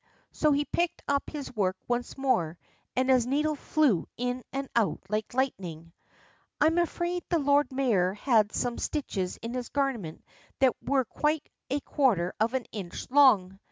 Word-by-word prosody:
So 305 - +2
he 290 +1 +2
picked 345 +2 -1
up 280 0 0
his 285 -4 -7
work 190 -3 0
once 245 +2 -2
more, 180 -12 +1 0.4
and 255 +1 +2
his 255 -3 +4
needle 300 +4 +1
flew 285 - +1
in 250 +1 -2
and 275 0 -3
out 215 -9 +2
like 215 +3 -2
lightning. 175 - -2 0.7
I - - +4
am 325 +2 +3
afraid 345 +1 -1
the 345 - +3
Lord 285 -2 +3
Mayor 215 -9 +1
had 215 -2 +3
some 245 -1 -2
stitches 195 - -2
in 230 +1 -4
his 250 -2 -4
garment 255 - -2 0.3
that 260 -2 +4
were 270 -2 +1
quite 300 +5 -1 0.2
a 280 +2 0
quarter 215 - +1
of 230 +4 +1
an 260 - -1
inch 195 +1 -7
long. 205 -10 +5
255 Hz, 165 wpm, -28 LUFS, 210-285 Hz, 0.7 s, long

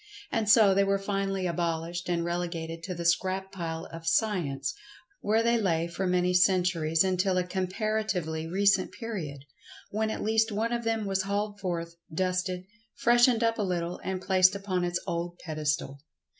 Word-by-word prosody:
And 220 -2 0
so 210 -2 +7
they 200 +1 +4
were 195 0 +2
finally 195 -1 -2
abol[Pg 170 -1 -1
97]ished 175 +1 -5
and 170 -1 0
relegated 170 -1 -3
to 185 - -4
the 170 0 -5
scrap 190 +3 +1
pile 165 -3 -5
of 165 0 -8
Science, 180 - 0 0.5
where 220 +2 +2
they 235 0 +3
lay 165 -4 +1
for 185 +2 -3
many 180 0 +2
centuries 180 -3 +3
until 185 0 +1
a 180 - +2
comparatively 185 -3 -2
recent 195 +2 +2
period, 160 - -6 0.5
when 220 +1 0
at - - -3
least 220 +1 +2
one 225 +3 -1
of 235 0 -1
them 225 -2 0
was 195 -1 0
hauled 205 +1 -2
forth, 170 -3 -4
dusted, 185 +1 -1 0.3
freshened 240 0 +4
up 230 0 +1
a - - +2
little, 180 -3 -2
and 190 -1 -3
placed 185 0 +4
upon 190 -2 -2
its 175 0 0
old 170 +1 -3
pedestal. 150 -3 -2
185 Hz, 170 wpm, -28 LUFS, 170-205 Hz, 0.5 s, so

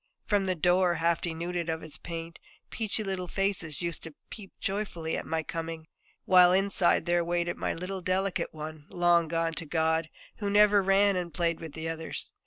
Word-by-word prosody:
From 205 -2 +2
the 185 -1 0
door, 180 +1 +3
half 170 0 +1
denuded 170 0 -3
of 160 0 -2
its 155 - -8
paint, 165 -1 -7 0.3
peachy 220 -1 -2
little 190 -2 -3
faces 180 -5 -1
used 170 -1 -2
to 165 -3 -8 0.2
peep 200 -3 -9
joyfully 195 -5 -2
at - - -5
my 160 0 -1
coming; 165 0 -5 0.4
while 180 -1 +7
inside 190 -3 +3
there 175 0 +2
waited 175 0 -1
my - - -2
little 185 +2 -5
delicate 185 +1 -1
one, 155 -1 -8
long 175 -1 +3
gone 165 0 0
to 165 - -5
God, 160 0 +1 0.3
who 205 -2 -2
never 205 0 +5
ran 195 +1 +4
and 175 -2 -2
played 170 -2 0
with 160 -3 -8
the 160 0 -5
others. 160 0 -5
175 Hz, 185 wpm, -29 LUFS, 165-190 Hz, 0.4 s, while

